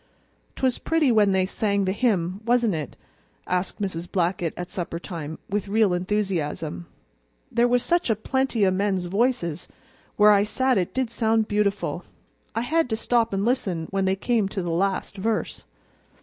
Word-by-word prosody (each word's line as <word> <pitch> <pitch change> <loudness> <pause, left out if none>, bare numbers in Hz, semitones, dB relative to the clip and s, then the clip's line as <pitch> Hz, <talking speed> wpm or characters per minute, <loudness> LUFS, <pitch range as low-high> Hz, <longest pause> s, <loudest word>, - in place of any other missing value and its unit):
"'Twas 260 -2 0
pretty 320 -5 +2
when 210 -3 +4
they 190 -1 +2
sang 200 0 0
the 185 - +1
hymn, 195 -4 0
wasn't 235 -2 +2
it?" 150 -5 -5 0.5
asked 180 +3 -2
Mrs. 180 -4 -4
Blackett 175 -3 0
at 180 0 -6
suppertime, 170 -3 -5
with 205 0 -2
real 210 -2 +3
enthusiasm. 175 - -2 0.6
"There 235 +1 +3
was 245 0 +2
such 345 -4 +1
a 225 - +3
plenty 250 0 0
o' 190 - +3
men's 190 -1 0
voices; 190 - 0 0.5
where 210 0 +6
I 200 -1 +5
sat 255 +3 +2
it 180 - -3
did 260 -3 0
sound 225 -1 +1
beautiful. 205 -1 -1 0.5
I 225 - +1
had 315 +3 +1
to 220 - 0
stop 230 0 +1
and 195 +1 -1
listen 190 -10 0
when 195 -1 0
they 190 0 +2
came 215 0 0
to 195 -2 -3
the 175 - -2
last 195 +3 -1
verse." 215 +3 -2
200 Hz, 165 wpm, -24 LUFS, 180-230 Hz, 0.6 s, where